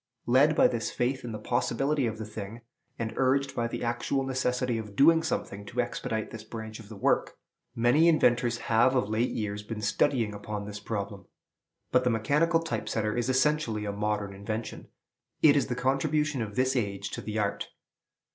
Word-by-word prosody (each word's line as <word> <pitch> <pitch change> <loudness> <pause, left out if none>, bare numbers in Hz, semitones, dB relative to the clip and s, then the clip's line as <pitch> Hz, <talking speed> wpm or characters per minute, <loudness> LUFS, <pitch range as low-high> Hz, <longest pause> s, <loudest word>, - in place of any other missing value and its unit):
Led 140 +6 +4
by - - +6
this 115 -3 -2
faith 130 +2 -1
in 120 - -5
the 110 - -4
possibility 135 +4 0
of 110 -1 -4
the 110 - -5
thing, 110 +1 -7 0.4
and 110 -1 -3
urged 135 +1 +2
by 115 - 0
the 115 - -5
actual 120 +3 -1
necessity 125 -2 0
of 105 -2 -8
doing 160 +6 +6
something 100 -10 -3
to 125 - -5
expedite 110 -2 -2
this 110 -1 -8
branch 110 0 -7
of 110 -2 -12
the 110 - -8
work, 100 - +1 0.4
many 120 +8 +4
inventors 120 -7 +3
have 115 +3 +4
of 125 -5 +2
late 110 +3 +1
years 105 -1 -3
been 105 +1 -6
studying 110 +1 +1
upon 105 0 -5
this 105 0 -7
problem. 100 -2 -5 0.6
But 125 - +4
the 125 - +2
mechanical 150 +9 +2
type 165 - -3
setter 105 -1 -1
is 120 +1 -1
essentially 130 -5 +1
a 100 - -2
modern 105 -1 -2
invention: 110 +3 -5 0.6
it 150 -2 +7
is 145 - +2
the 125 - -2
contribution 140 +2 0
of 105 -2 -5
this 130 +1 +2
age 100 -4 -2
to - - -5
the 110 0 -4
art. 100 -2 -1
115 Hz, 185 wpm, -28 LUFS, 105-130 Hz, 0.6 s, it